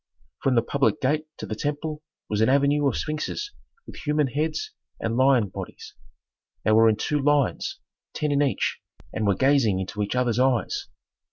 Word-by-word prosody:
From 135 -2 +2
the 115 - +4
public 140 +4 +1
gate 150 +3 0
to - - -6
the - - -4
temple 150 +4 -3 0.3
was 105 0 -1
an 110 - +4
avenue 140 +1 +3
of 130 - 0
sphinxes 155 - -3 0.3
with - - -11
human 150 0 +1
heads 150 +4 -2 0.3
and 115 0 -2
lion 130 -5 +4
bodies. - - -8 0.7
They 110 - +2
were 110 +1 +6
in 110 - +2
two 150 +7 -1
lines, 145 -2 +1 0.4
ten 150 -1 -1
in 140 0 +2
each, 140 -2 0 0.3
and 110 - -1
were 100 - +3
gazing 130 -5 +3
into 95 +3 -4
each 105 +4 -2
others' 125 -2 +1
eyes. 130 -2 +1
135 Hz, 175 wpm, -25 LUFS, 115-150 Hz, 0.7 s, were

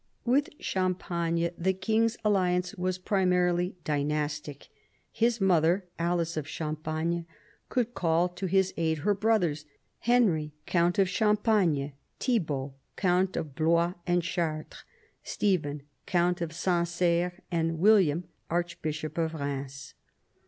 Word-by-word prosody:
With 270 +4 +2
Champagne 170 -2 -1
the 190 +2 +2
king's 225 +4 +1
alliance 180 -3 +2
was 185 0 -2
primarily 180 -2 +1
dynastic. 150 -1 -2 0.4
His 230 0 +1
mother, 180 0 +3
Alice 170 -1 0
of 150 - -3
Champagne, 160 +2 -3 0.4
could 245 -1 0
call 170 -2 +2
to 180 +2 -4
his 190 +1 +2
aid 160 -1 +1
her 205 - +4
brothers, 190 -8 +1 0.3
Henry, 190 -12 +2
count 175 0 +2
of 195 -1 +4
Champagne, 200 - +2 0.3
Thibault, 150 - -1 0.2
count 185 0 +1
of 150 -4 -4
Blois 170 +3 +2
and 175 0 +2
Chartres, 165 -3 -3 0.4
Stephen, 150 -8 -1 0.2
count 175 0 +1
of 170 -2 -2
Sancerre, 175 0 0
and 165 -1 0
William, 180 -4 +4 0.3
archbishop 160 -2 -3
of 165 0 0
Eheims. 140 -3 -5
175 Hz, 115 wpm, -28 LUFS, 160-190 Hz, 0.4 s, her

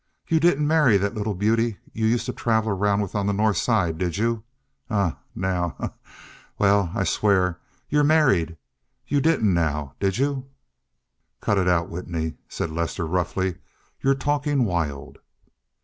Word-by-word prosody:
You 160 - +3
didn't 150 -3 +3
marry 150 -9 +5
that 100 +2 -1
little 105 -2 -2
beauty 110 +2 +1 0.2
you 110 0 0
used 120 +1 +1
to - - -3
travel 110 -2 +1
around 100 +1 +1
with 100 - -4
on 100 -1 -1
the 100 - +1
North 105 -1 +2
Side, 90 -9 +1
did 90 0 -1
you? 115 0 0 0.5
Eh, 100 -6 +1 0.2
now! 90 -2 -1
Ha, - - -3
ha! - - -27 0.4
Well, 100 -3 +3
I - - +1
swear. 95 -4 +2 0.3
You 150 0 +2
married! 130 - +3 0.5
You 145 0 +1
didn't, 130 - +3
now, 75 -4 -1
did 95 0 0
you?" 135 0 -1 0.9
"Cut 100 - +1
it 90 - +1
out, 85 -2 +2
Whitney," 85 -2 -4 0.2
said 80 - -3
Lester 85 +1 -2
roughly. 90 +2 -1 0.4
"You're 135 0 +3
talking 145 -1 +1
wild." 75 -7 -3
100 Hz, 160 wpm, -24 LUFS, 90-120 Hz, 0.9 s, marry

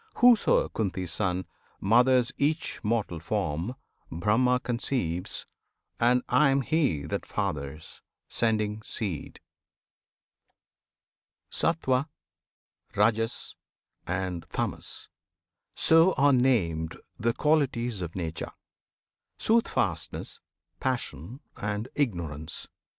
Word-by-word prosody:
Whoso, 245 -2 +5
Kunti's 95 -5 -2
Son! 95 -3 0 0.3
Mothers 125 +4 +4
each 155 +3 0
mortal 105 -6 0
form, 85 - -2 0.4
Brahma 115 +9 +2
conceives, 115 -8 -1 0.5
And 125 +1 +4
I 150 -2 +4
am 135 0 +3
He 135 - +1
that 75 - -3
fathers, 70 +1 -4 0.3
sending 110 -1 +1
seed! 100 -7 -4 2.1
Sattwan, 135 -4 +1 0.9
Rajas, 115 +2 +1 0.5
and 90 -1 -2
Tamas, - - -3 0.7
so 165 +3 +5
are 140 0 +4
named 90 -12 +2 0.2
The 115 +1 +1
qualities 125 -9 +1
of 85 -1 -5
Nature, 80 -3 -4 0.8
"Soothfastness," 230 +1 0 0.4
"Passion," 125 - -3 0.2
and 105 +3 -3
"Ignorance." 85 - -3
110 Hz, 85 wpm, -28 LUFS, 90-130 Hz, 2.1 s, Whoso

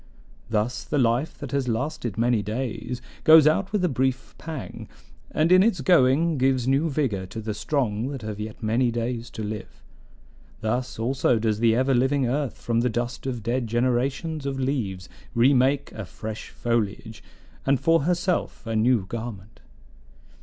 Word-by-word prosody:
Thus 110 +3 -1
the 150 - -2
life 125 +3 +1
that 140 -4 -7
has 140 -2 0
lasted 120 -2 -2
many 115 -1 +2
days 120 +3 -4 0.2
goes 160 -2 +8
out 185 +6 +2
with 205 -4 +1
a - - +3
brief 130 -2 -1
pang, 160 -4 -7 0.4
and 160 +3 +1
in 185 0 +8
its 200 -4 +2
going 150 +1 +3
gives 130 -1 +2
new 140 +5 +2
vigor 125 -11 -1
to 110 - -7
the 110 0 -3
strong 115 -2 -1
that 135 -4 -6
have 105 -1 -5
yet 110 +1 -7
many 120 +3 +2
days 120 0 -3
to 110 - -6
live. 105 0 -7 0.8
Thus 125 +4 -2
also 125 +1 +1
does 110 -1 0
the 115 -1 +4
ever 130 +2 +2
living 130 +2 +2
earth 140 +1 -1
from 115 -1 0
the 125 +1 +2
dust 120 +2 -3
of 120 -4 -3
dead 120 +1 -1
generations 130 +6 -1
of 135 -1 -3
leaves 110 -9 -2 0.3
re 125 +4 +5
make 135 +2 +2
a 110 - -7
fresh 110 +4 -7
foliage, 110 -2 -2 0.4
and 135 -1 +2
for 165 +4 +3
herself 175 -1 -1
a 115 -1 -3
new 110 -2 +3
garment. 110 -1 -7
125 Hz, 165 wpm, -25 LUFS, 110-140 Hz, 0.8 s, goes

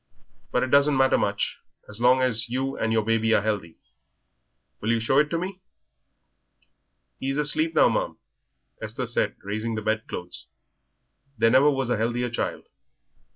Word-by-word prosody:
But 125 - +1
it 130 - -3
doesn't 140 0 +4
matter 130 0 +4
much, 100 0 -1 0.3
so - - -9
long 130 +1 +5
as 115 -1 +1
you 135 +2 -2
and 110 - -1
your 110 -1 +1
baby 115 0 +2
are - - +3
healthy. 100 -7 -3 1.0
Will 110 - -3
you 115 0 +2
show 125 +5 +2
it 150 0 +2
to 165 - -1
me?" 185 +2 -5 1.6
"He 135 - -3
is 135 - -1
asleep 155 +2 +2
now, - - +6
ma'am," - - -1 0.6
Esther 115 +4 -4
said, 120 - -1
raising 110 +3 -3
the 110 - -3
bed 110 +1 -1
clothes; 90 0 -8 0.9
"there 115 +1 +3
never 135 +4 +6
was 135 -3 -1
a 120 - +1
healthier 120 +2 -1
child." 115 - -3
120 Hz, 165 wpm, -25 LUFS, 110-135 Hz, 1.6 s, now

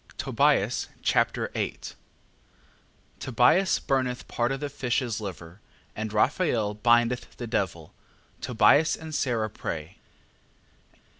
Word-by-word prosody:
Tobias - - +1 0.2
Chapter - - +1
8 - - -4 1.3
Tobias 130 - +3
burneth 130 -2 -1
part 120 +2 -1
of 135 - -2
the 145 - -3
fish's 125 -4 -2
liver, 90 -2 -8 0.3
and 110 0 -4
Raphael 110 - +1
bindeth 120 +3 +1
the 120 - -5
devil. 90 -8 -3 0.5
Tobias 125 +7 +4
and 160 -1 -9
Sara 120 -6 0
pray. 80 -5 -6
120 Hz, 100 wpm, -26 LUFS, 105-130 Hz, 1.3 s, Tobias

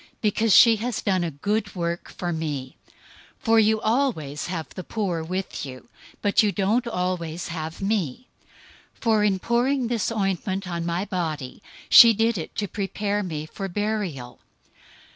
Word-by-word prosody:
Because 215 +1 +1
she 230 +2 +8
has 235 +2 -3
done 185 -3 +1
a 170 - -1
good 205 +9 -2
work 170 -1 -3
for 175 -1 -4
me. 145 -5 -4 0.7
026:011 - - -25
For 225 -1 +5
you 220 0 +3
always 215 - 0
have 170 -3 -4
the 185 - -8
poor 185 -5 -2
with 185 +3 -4
you; 130 -2 -9 0.3
but 205 - +4
you 210 -2 +2
don't 215 +5 +1
always 180 -5 -3
have 160 0 -5
me. 200 - -1 0.7
026:012 - - -30
For 220 -3 +3
in 200 -2 +2
pouring 245 +5 +1
this 230 -3 -1
ointment 195 -2 -2
on 170 -1 -3
my 175 +3 -1
body, 160 -7 -4 0.3
she 230 -1 +9
did 225 -1 +1
it 160 - -7
to 205 - -2
prepare 205 +1 -2
me 155 -6 -4
for 195 +5 -6
burial. 190 - -3
195 Hz, 160 wpm, -24 LUFS, 170-220 Hz, 0.7 s, she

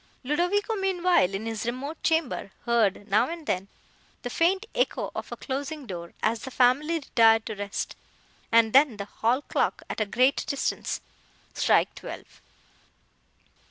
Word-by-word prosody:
Ludovico, 355 - +1
meanwhile, 365 - +2
in 205 +3 -4
his 225 +1 -3
remote 275 +6 -4
chamber, 320 -10 0 0.2
heard, 220 -4 +1
now 210 +6 +3
and 335 -2 -6
then, 190 -6 -1 0.6
the 245 - -4
faint 375 - +2
echo - - 0
of - - -6
a - - -5
closing 285 +2 -4
door, 170 -5 -7
as 225 +1 +1
the 265 - -6
family 265 +6 +3
retired 225 -7 +4
to 220 - -4
rest, 205 -1 -4 0.6
and 230 -1 +5
then 270 -4 +5
the 200 - -4
hall 235 +6 0
clock, - - -1
at - - -3
a 215 - 0
great 255 +6 +2
distance, 280 -1 -2 0.5
strike - - +3
twelve. - - -10
255 Hz, 150 wpm, -27 LUFS, 220-320 Hz, 0.6 s, and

